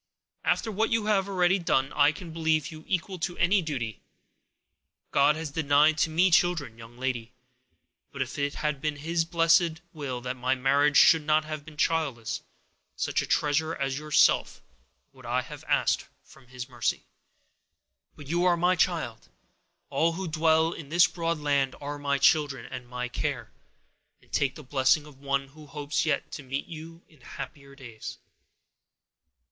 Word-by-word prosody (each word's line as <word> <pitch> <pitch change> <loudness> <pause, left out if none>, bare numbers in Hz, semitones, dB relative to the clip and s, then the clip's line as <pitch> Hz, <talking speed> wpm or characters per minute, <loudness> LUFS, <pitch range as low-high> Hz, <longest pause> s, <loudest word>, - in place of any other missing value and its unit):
After 225 - +1
what 220 +2 0
you 225 -2 +1
have 200 -2 +1
already 185 0 +2
done, 135 -6 +1
I 145 0 +5
can 165 +2 -9
believe 160 -3 0
you 155 0 -10
equal 185 0 -2
to 175 +2 -3
any 190 +3 +3
duty. 125 - -4 1.1
God 140 +2 +4
has 160 -2 -5
denied 150 +1 +3
to 160 - +2
me 175 +4 +3
children, 165 -9 +2
young 115 +1 -13
lady; 125 -2 -3 0.8
but 140 - -10
if 135 +2 -3
it 140 0 -1
had 150 -3 -2
been 155 -1 -1
His 165 +3 -1
blessed 165 -1 +3
will 140 -6 -4
that 125 +1 -4
my 130 +1 +1
marriage 140 +3 +3
should 160 -1 +7
not 155 +1 +2
have 155 -1 -5
been 150 -1 -13
childless, 140 -9 -1 0.5
such - - 0
a - - -5
treasure 155 +2 +1
as 135 0 -2
yourself 150 -1 +2 0.5
would - - -17
I - - 0
have - - -10
asked - - +1 0.2
from 130 -2 -19
His 125 0 -7
mercy. 120 -4 -2 1.1
But 145 - -11
you 170 +5 0
are 175 -1 +4
my 180 +2 +3
child: 160 -11 -1 0.6
all 165 +1 +2
who 190 +2 -4
dwell 160 0 +3
in 150 -4 -9
this 170 +2 +6
broad 165 0 -2
land 140 -3 0
are 145 0 -5
my 140 -1 0
children, 145 -1 +2
and 125 -1 -8
my 125 0 -4
care; 125 -2 -3 0.7
and - - -27
take 135 -2 0
the 150 - -10
blessing 135 +3 +2
of 145 -3 -15
one 140 -1 -1
who 150 +2 -15
hopes 145 +1 -2
yet - - -1
to - - -6
meet 135 +1 -4
you 165 +1 -10
in 155 -5 -23
happier 140 +2 -9
days." 120 -5 -9
150 Hz, 170 wpm, -27 LUFS, 135-165 Hz, 1.1 s, should